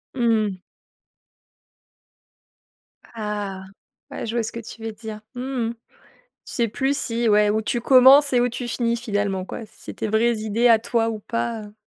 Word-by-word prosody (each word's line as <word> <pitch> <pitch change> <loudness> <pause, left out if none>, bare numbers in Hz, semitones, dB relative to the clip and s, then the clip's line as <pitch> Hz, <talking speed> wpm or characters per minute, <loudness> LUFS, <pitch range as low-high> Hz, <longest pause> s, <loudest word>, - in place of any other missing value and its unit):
Mmh. 220 -6 +1 2.6
Ah 205 -3 -4 0.5
ouais - - -5
je 230 +1 -4
vois 235 - +1
ce 225 - -4
que 235 - -6
tu 230 0 -11
veux 225 - -3
dire, 215 0 -8 0.2
mmh 245 - -5 0.3
mh. - - -5 0.7
Tu - - -9
sais 235 -2 +2
plus 270 +6 -1
si 230 -2 0
ouais, 210 0 +4
où 220 +1 0
tu 235 +2 -2
commences 265 +3 +7
et 245 - +4
où 245 - +2
tu 240 +1 -5
finis 235 0 0
finalement 205 -5 -2
quoi? 225 - -7
C'était 220 - -7
des - - -4
vraies 235 +1 +2
idées 220 +3 +1
à 230 -2 +6
toi 230 0 0
ou 220 -1 -4
pas, 230 +1 -3
heu 210 0 -12
230 Hz, 175 wpm, -23 LUFS, 210-240 Hz, 2.6 s, commences